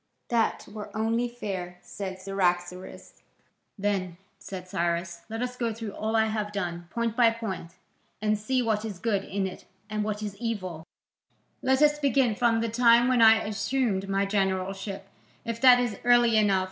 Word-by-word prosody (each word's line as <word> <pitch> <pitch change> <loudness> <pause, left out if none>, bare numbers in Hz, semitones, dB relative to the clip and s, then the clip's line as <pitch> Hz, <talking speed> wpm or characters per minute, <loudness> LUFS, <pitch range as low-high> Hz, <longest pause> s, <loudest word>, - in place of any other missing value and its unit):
"That 230 -2 0
were 210 0 -8
only 230 +2 0
fair," 190 -7 -5
said 190 -2 -6
Cyaxares. 180 -1 -2 0.6
"Then," 190 -4 -1 0.2
said 185 -2 -8
Cyrus, 170 -1 -2
"let 225 +2 -3
us 250 0 -4
go 235 -2 -1
through 225 -2 -5
all 220 +2 -3
I 220 0 +4
have 215 -1 -2
done, 175 -4 -4
point 230 +2 -2
by 240 -2 +6
point, 195 -7 -5 0.4
and 215 +1 +1
see 250 +5 0
what 220 -2 0
is 215 -4 -5
good 200 -1 0
in 195 0 -2
it 190 - -7 0.3
and 215 0 -1
what 210 0 -3
is 205 -1 -4
evil. 185 -8 -4 0.7
Let 265 +2 +3
us 295 0 +4
begin 270 -5 +2
from 230 +1 +2
the 230 - 0
time 235 +1 +5
when 250 -2 +3
I 220 0 +7
assumed 210 -2 -1
my 195 0 +1
generalship, 195 0 -2 0.4
if 230 -1 -4
that 250 -2 +8
is 240 -4 -2
early 240 -1 +5
enough. 205 -3 +4
215 Hz, 170 wpm, -27 LUFS, 190-230 Hz, 0.7 s, that